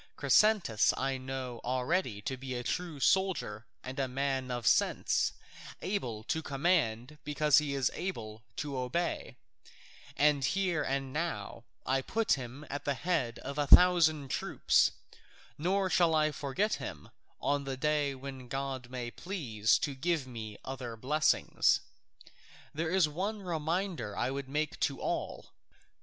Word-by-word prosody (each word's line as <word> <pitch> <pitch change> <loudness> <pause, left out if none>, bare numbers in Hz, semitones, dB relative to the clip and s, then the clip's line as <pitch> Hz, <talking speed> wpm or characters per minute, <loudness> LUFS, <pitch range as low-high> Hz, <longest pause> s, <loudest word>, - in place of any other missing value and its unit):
Chrysantas 210 - +4
I 135 0 -1
know 130 -2 -5
already 125 - -1
to 130 - -2
be 130 0 -6
a 120 - -3
true 170 +1 -3
soldier 170 - +1 0.2
and 130 +2 -6
a 135 - +1
man 135 0 -1
of 120 -2 -3
sense, - - +3 0.5
able 125 - -3
to 160 - -1
command 140 -3 0
because 150 0 +4
he 145 -2 -2
is 135 -2 +1
able 110 - -5
to 140 -3 -3
obey, 130 +8 -2 0.8
and 145 -2 +4
here 180 +2 +1
and 135 -2 -2
now 160 -6 -3 0.2
I 135 +1 +1
put 225 +10 -1
him 130 +2 -5
at 145 +2 -5
the 140 - 0
head 145 -8 -1
of 140 +2 -4
a 145 - +1
thousand 160 -5 +6
troops, - - +3 0.7
nor 190 +5 +1
shall 170 -3 +3
I 155 0 +3
forget 150 +10 -1
him - - -7 0.3
on 140 0 0
the 135 -1 -3
day 145 -1 +1
when 130 -1 -8
God 135 -1 -4
may 125 -2 -5
please 120 - 0
to 145 - -2
give 155 +1 0
me 110 -4 -7
other 125 -3 -5
blessings. 155 +6 +2 0.9
There 160 +2 -1
is 185 -2 +4
one 195 +7 -3
reminder 170 - -2
I 130 - 0
would 135 -1 -5
make 150 +2 -2
to - - 0
all. - - -3
140 Hz, 145 wpm, -31 LUFS, 130-165 Hz, 0.9 s, thousand